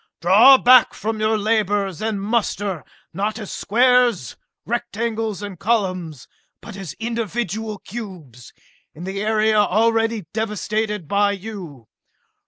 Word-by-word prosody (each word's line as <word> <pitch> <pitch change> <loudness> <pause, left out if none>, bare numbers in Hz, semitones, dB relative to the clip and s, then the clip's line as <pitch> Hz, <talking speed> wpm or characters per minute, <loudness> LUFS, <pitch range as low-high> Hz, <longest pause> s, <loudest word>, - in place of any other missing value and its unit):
Draw 215 +10 +7
back 250 -1 +5
from 220 +1 -3
your 215 0 +1
labors, 205 -4 0
and 215 -2 -2
muster, 205 - -2 0.3
not 205 +5 -2
as 215 -4 -7
squares, 245 - +2 0.3
rectangles 225 -2 -3
and 195 -4 -7
columns, 185 - -2 0.3
but 220 - -11
as 195 -7 -7
individual 225 -2 -4
cubes, 180 - -10 0.4
in 165 - -9
the 195 +2 -4
area 215 0 +2
already 225 +1 +1
devastated 210 -3 -2
by 200 +3 +2
you! 185 - -9
210 Hz, 115 wpm, -21 LUFS, 190-225 Hz, 0.4 s, Draw